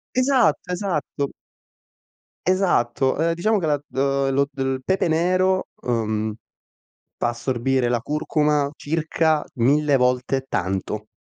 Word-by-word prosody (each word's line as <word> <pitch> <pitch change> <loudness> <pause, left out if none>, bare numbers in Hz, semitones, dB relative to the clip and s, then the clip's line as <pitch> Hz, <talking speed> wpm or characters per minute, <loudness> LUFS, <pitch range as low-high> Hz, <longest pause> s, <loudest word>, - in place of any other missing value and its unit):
Esatto, 255 -8 +2
esatto. 160 -7 -2 1.2
Esatto. 135 -9 +2
Ehm, 165 +1 +2
diciamo 210 +5 +1
che 160 - -1
la 145 -1 +2
d 135 0 0
lo 140 +1 +2
d 140 - -14
il 135 0 -1
pepe 190 +1 +1
nero, 185 +3 +2 0.2
uhm, 110 -3 -1 0.8
fa - - 0
assorbire 125 +1 0
la 120 -1 +1
curcuma 150 0 0
circa 160 0 0
1000 140 +3 +3
volte 125 +1 +1
tanto, 95 +3 -2
140 Hz, 120 wpm, -22 LUFS, 125-165 Hz, 1.2 s, 1000